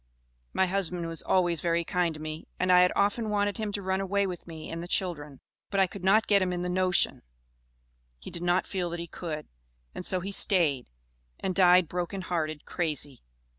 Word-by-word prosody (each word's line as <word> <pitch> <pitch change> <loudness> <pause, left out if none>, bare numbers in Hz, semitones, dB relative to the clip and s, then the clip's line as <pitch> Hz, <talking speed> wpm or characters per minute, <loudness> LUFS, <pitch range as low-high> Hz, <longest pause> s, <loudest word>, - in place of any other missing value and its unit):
My 190 - +2
husband 180 -2 -2
was 165 0 -3
always 175 -3 +2
very 170 0 +1
kind 175 -2 0
to - - -9
me, 155 +1 -6
and 185 0 +2
I 180 0 +7
had 180 - +4
often 205 +3 +1
wanted 205 -1 0
him 215 -2 -2
to 200 - -3
run 190 +1 0
away 200 +1 +1
with 180 -3 -6
me 160 -2 -8
and 165 0 -4
the 175 - -6
children, 150 -7 -2 0.3
but 195 - 0
I 190 - +6
could 185 0 -9
not 210 +4 +4
get 200 -1 +4
him 185 -1 +1
in 175 0 -2
the 180 - -2
notion; 185 0 +1 1.0
he - - -10
did 170 - -5
not 175 +1 +2
feel 180 -3 -2
that 170 0 -5
he 170 - -4
could, 160 -2 -6 0.5
and - - -6
so 185 0 +1
he 190 +3 -5
stayed, 165 -10 +3 0.5
and 190 - -2
died 180 -2 +6
broken 180 +3 -3
hearted, 155 -4 -3
crazy. 150 -6 -2
180 Hz, 210 wpm, -28 LUFS, 165-190 Hz, 1.0 s, I